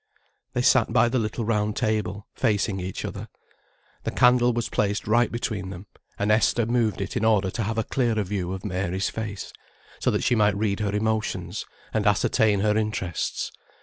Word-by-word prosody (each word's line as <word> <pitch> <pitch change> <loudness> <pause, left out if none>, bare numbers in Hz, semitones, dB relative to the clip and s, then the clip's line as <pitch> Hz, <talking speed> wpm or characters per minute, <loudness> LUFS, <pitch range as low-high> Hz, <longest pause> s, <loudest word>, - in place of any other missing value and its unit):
They - - 0
sat - - +4
by 120 - +4
the 130 +1 +1
little 110 +1 -2
round 105 -1 0
table, 105 -2 -1
facing 100 -2 0
each 90 0 -4
other. - - -6 0.8
The - - -1
candle 125 0 +4
was 120 0 -1
placed 105 0 -1
right 115 +3 +3
between 110 -6 -3
them, 95 +1 -8 0.3
and 105 +1 +1
Esther 110 +2 +3
moved 115 -4 +1
it 95 - -4
in - - 0
order 105 -4 +3
to 115 - -3
have 110 +1 -2
a 115 - +2
clearer 115 -5 0
view 95 -2 -3
of 95 +1 -5
Mary's 95 0 -1
face, 105 -3 -5 0.5
so - - +1
that - - 0
she - - +3
might 105 -3 +3
read 100 -1 0
her 105 -1 -1
emotions, 105 -4 -2 0.3
and 105 -2 +1
ascertain 105 0 +3
her 105 0 +2
interests. 105 -6 -2
105 Hz, 180 wpm, -25 LUFS, 100-110 Hz, 0.8 s, sat